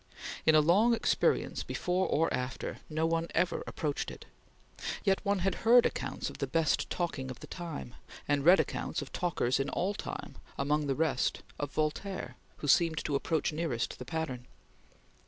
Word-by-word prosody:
In 160 Hz, -, +7 dB
a 155 Hz, -, +7 dB
long 205 Hz, +10 st, +5 dB
experience, -, -, +1 dB
before 180 Hz, +1 st, 0 dB
or 165 Hz, +2 st, +2 dB
after, 125 Hz, 0 st, -3 dB
no 155 Hz, +1 st, 0 dB
one 165 Hz, 0 st, +1 dB
ever 175 Hz, +1 st, +1 dB
approached 150 Hz, -2 st, -2 dB
it; -, -, -10 dB, 0.8 s
yet 195 Hz, -1 st, +2 dB
one 200 Hz, -1 st, +2 dB
had 195 Hz, -, +2 dB
heard 240 Hz, +2 st, +7 dB
accounts -, -, -2 dB
of -, -, -8 dB
the -, -, -1 dB
best 165 Hz, -2 st, +1 dB
talking 145 Hz, -7 st, -2 dB
of 130 Hz, -, -7 dB
the -, -, -9 dB
time, 165 Hz, -8 st, -6 dB, 0.3 s
and 145 Hz, -1 st, +2 dB
read 175 Hz, +5 st, +7 dB
accounts -, -, -1 dB
of -, -, -12 dB
talkers 165 Hz, -8 st, 0 dB
in 135 Hz, +1 st, 0 dB
all 190 Hz, +3 st, 0 dB
time, -, -, -6 dB, 0.2 s
among 150 Hz, +1 st, +1 dB
the 135 Hz, -, +1 dB
rest, 145 Hz, -5 st, 0 dB, 0.2 s
of 145 Hz, -, -2 dB
Voltaire, 155 Hz, +6 st, -2 dB, 0.2 s
who 145 Hz, -, -5 dB
seemed 165 Hz, +2 st, +4 dB
to 150 Hz, -, -1 dB
approach 155 Hz, +2 st, 0 dB
nearest 150 Hz, -8 st, -2 dB
the 125 Hz, -, -6 dB
pattern. 130 Hz, -5 st, -4 dB
160 Hz, 175 wpm, -31 LUFS, 145-175 Hz, 0.8 s, In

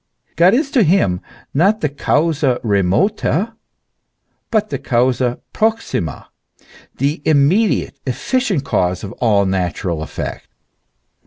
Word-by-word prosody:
God 180 Hz, +6 st, +5 dB
is 275 Hz, +1 st, 0 dB
to 255 Hz, -, +3 dB
him 160 Hz, -, +2 dB, 0.3 s
not 195 Hz, +9 st, +2 dB
the 150 Hz, -, +2 dB
causa 145 Hz, -2 st, +1 dB
remota 155 Hz, -, +1 dB, 1.0 s
but 215 Hz, -2 st, 0 dB
the -, -, -2 dB
causa 125 Hz, 0 st, 0 dB
proximo,, 220 Hz, -, -1 dB, 0.7 s
the 145 Hz, +4 st, -1 dB
immediate, 160 Hz, +9 st, +2 dB
efficient 195 Hz, -, 0 dB
cause 90 Hz, -4 st, 0 dB
of 100 Hz, -, -6 dB
all 105 Hz, -4 st, +3 dB
natural 90 Hz, -3 st, -2 dB
effects. 80 Hz, -, -6 dB
145 Hz, 105 wpm, -18 LUFS, -, 1.0 s, God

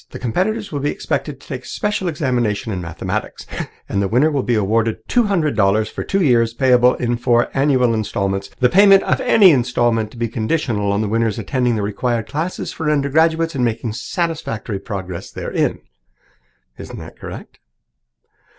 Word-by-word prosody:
The -, -, -8 dB
competitors 195 Hz, -, -1 dB
will 145 Hz, -, -2 dB
be 145 Hz, +1 st, 0 dB
expected -, -, -3 dB
to -, -, -18 dB
take -, -, -5 dB
a -, -, -12 dB
special 210 Hz, -4 st, -2 dB
examination 120 Hz, -9 st, -1 dB
in 90 Hz, -, -3 dB
mathematics, 85 Hz, -2 st, -4 dB, 0.4 s
and 100 Hz, -, -1 dB
the 100 Hz, -, +1 dB
winner 130 Hz, +9 st, +3 dB
will 140 Hz, -2 st, 0 dB
be 120 Hz, -1 st, 0 dB
awarded 110 Hz, +2 st, 0 dB
two 240 Hz, -2 st, +2 dB
hundred 170 Hz, -8 st, 0 dB
dollars 105 Hz, +1 st, +2 dB
for -, -, -5 dB
two 195 Hz, -1 st, 0 dB
years, 115 Hz, -5 st, +3 dB
payable 125 Hz, -1 st, +4 dB
in 120 Hz, -1 st, -1 dB
four 120 Hz, 0 st, +2 dB
annual 135 Hz, -4 st, +2 dB
instalments, 100 Hz, -2 st, -2 dB
the 125 Hz, -, +5 dB
payment 195 Hz, +5 st, +6 dB
of -, -, 0 dB
any 200 Hz, -5 st, +6 dB
instalment 120 Hz, -4 st, +1 dB
to 120 Hz, -, -15 dB
be 115 Hz, 0 st, -1 dB
conditional 110 Hz, -3 st, -1 dB
on 100 Hz, +1 st, 0 dB
the 110 Hz, -, -1 dB
winner's 115 Hz, 0 st, 0 dB
attending 120 Hz, +2 st, 0 dB
the 105 Hz, -, -1 dB
required 115 Hz, +3 st, -1 dB
classes 165 Hz, +5 st, -4 dB
for 160 Hz, -2 st, -2 dB
undergraduates 160 Hz, +3 st, +2 dB
and 130 Hz, -3 st, -1 dB
making 115 Hz, -1 st, -1 dB
satisfactory 125 Hz, -, -3 dB
progress 95 Hz, -4 st, -6 dB
therein.' -, -, -2 dB, 1.0 s
Isn't -, -, -8 dB
that -, -, -11 dB
correct?" -, -, -9 dB
120 Hz, 175 wpm, -19 LUFS, 110-150 Hz, 1.0 s, payment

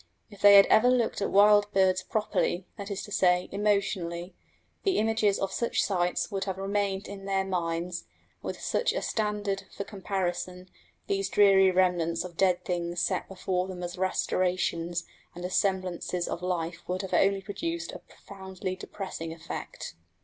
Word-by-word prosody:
If 205 Hz, -, -14 dB
they 205 Hz, 0 st, +9 dB
had 200 Hz, -, +9 dB
ever 240 Hz, +3 st, +5 dB
looked 240 Hz, -4 st, +1 dB
at 200 Hz, -, 0 dB
wild 205 Hz, +1 st, +5 dB
birds 190 Hz, -1 st, +3 dB
properly 195 Hz, -4 st, -1 dB
that 200 Hz, 0 st, -7 dB
is 200 Hz, -1 st, -4 dB
to 205 Hz, -, -10 dB
say, 180 Hz, -2 st, +3 dB
emotionally 195 Hz, -4 st, -1 dB, 0.5 s
the 390 Hz, -, +1 dB
images 220 Hz, -2 st, +2 dB
of 195 Hz, 0 st, -2 dB
such 235 Hz, +4 st, 0 dB
sights 180 Hz, +1 st, 0 dB
would 195 Hz, -1 st, -2 dB
have 190 Hz, -2 st, -3 dB
remained 195 Hz, 0 st, -1 dB
in 195 Hz, -1 st, -8 dB
their 195 Hz, -1 st, 0 dB
minds; 175 Hz, -1 st, -2 dB
and, -, -, -38 dB, 0.3 s
with -, -, -5 dB
such -, -, 0 dB
a -, -, -2 dB
standard 205 Hz, -2 st, -1 dB
for -, -, -2 dB
comparison, 185 Hz, -2 st, -4 dB, 0.3 s
these 395 Hz, -1 st, -1 dB
dreary 195 Hz, -2 st, +6 dB
remnants 180 Hz, -3 st, +1 dB
of 180 Hz, -2 st, -9 dB
dead 185 Hz, 0 st, +2 dB
things 175 Hz, -1 st, -2 dB
set -, -, 0 dB
before 185 Hz, -1 st, -2 dB
them 180 Hz, -1 st, -6 dB
as 175 Hz, 0 st, -4 dB
restorations 180 Hz, -2 st, 0 dB, 0.3 s
and 175 Hz, +1 st, -6 dB
as 185 Hz, -, -2 dB
semblances 185 Hz, -2 st, 0 dB
of 175 Hz, -, -4 dB
life 175 Hz, -2 st, -2 dB
would 185 Hz, +2 st, -2 dB
have 190 Hz, -, -6 dB
only 195 Hz, 0 st, +3 dB
produced 330 Hz, -, -4 dB
a -, -, -8 dB
profoundly 190 Hz, -1 st, -7 dB
depressing 185 Hz, -4 st, -6 dB
effect. 165 Hz, 0 st, -7 dB
190 Hz, 165 wpm, -28 LUFS, 180-200 Hz, 0.5 s, they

